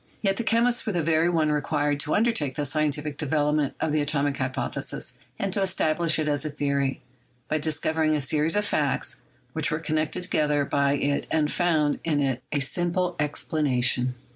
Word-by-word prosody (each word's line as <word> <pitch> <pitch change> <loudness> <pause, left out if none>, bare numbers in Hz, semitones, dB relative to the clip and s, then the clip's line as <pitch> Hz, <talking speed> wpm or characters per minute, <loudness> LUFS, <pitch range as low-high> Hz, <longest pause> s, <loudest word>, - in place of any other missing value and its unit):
Yet 195 -1 +2
the 235 - -1
chemist 235 +2 +2
was 210 - -1
the 170 - +1
very 160 +2 +3
one 160 -3 +2
required 145 -1 0
to 150 - 0
undertake 210 - +1
the 145 - -1
scientific 150 0 -1
development 150 -1 +1
of 160 - 0
the 150 0 +2
atomic 145 -1 +1
hypothesis 130 -1 -2 0.2
and 195 -2 -2
to 200 - +1
establish 170 -3 +1
it 155 -1 -1
as 145 -2 0
a 155 - -3
theory, 140 -2 -1 0.5
by 155 - 0
discovering 155 +1 0
a - - +1
series 150 +5 +1
of 210 0 +1
facts - - 0 0.3
which - - 0
were 155 - 0
connected 155 +2 -1
together 150 -4 +1
by 140 0 +1
it 145 0 0
and 150 -1 +1
found 160 -5 +1
in 155 -3 +1
it 135 -3 0
a 145 - 0
sim 175 +6 0
ple 180 0 -1
explanation. 130 -4 0
150 Hz, 185 wpm, -25 LUFS, 145-165 Hz, 0.5 s, very